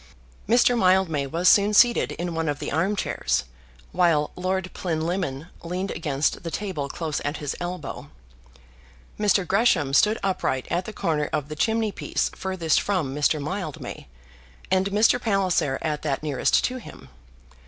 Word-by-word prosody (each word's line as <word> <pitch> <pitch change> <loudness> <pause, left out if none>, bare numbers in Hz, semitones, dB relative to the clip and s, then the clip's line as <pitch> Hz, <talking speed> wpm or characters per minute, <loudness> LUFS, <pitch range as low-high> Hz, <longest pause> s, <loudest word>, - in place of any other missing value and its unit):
Mr. 245 +1 +5
Mildmay 185 -8 +2
was 170 +6 0
soon 205 +2 +5
seated 220 - +4
in 175 +2 -4
one 165 -1 -1
of 145 - -1
the - - -5
armchairs, 185 - 0 0.5
while 165 -5 +2
Lord 185 0 -2
Plinlimmon 165 -3 -2
leaned 180 +3 -3
against 145 -2 -1
the 170 - -5
table 165 -7 -4
close 160 -1 -3
at 145 +2 -2
his 145 -2 -4
elbow. 175 -3 -5 1.1
Mr. 205 -2 +3
Gresham 185 - +2
stood 210 +9 +4
upright 155 -9 -1
at 175 +2 0
the - - -6
corner 160 -7 -1
of 145 -1 -2
the 155 - -5
chimney 220 +5 +1
piece - - -2
furthest 185 -5 0
from 180 -10 -1
Mr. 150 +1 +1
Mildmay, 155 +1 -5 0.6
and 190 +1 +3
Mr. 220 +4 +3
Palliser 185 - +1
at 150 -1 -2
that 145 -1 -2
nearest 150 -3 +2
to 255 - -1
him. 70 - -12
175 Hz, 150 wpm, -24 LUFS, 150-195 Hz, 1.1 s, Mr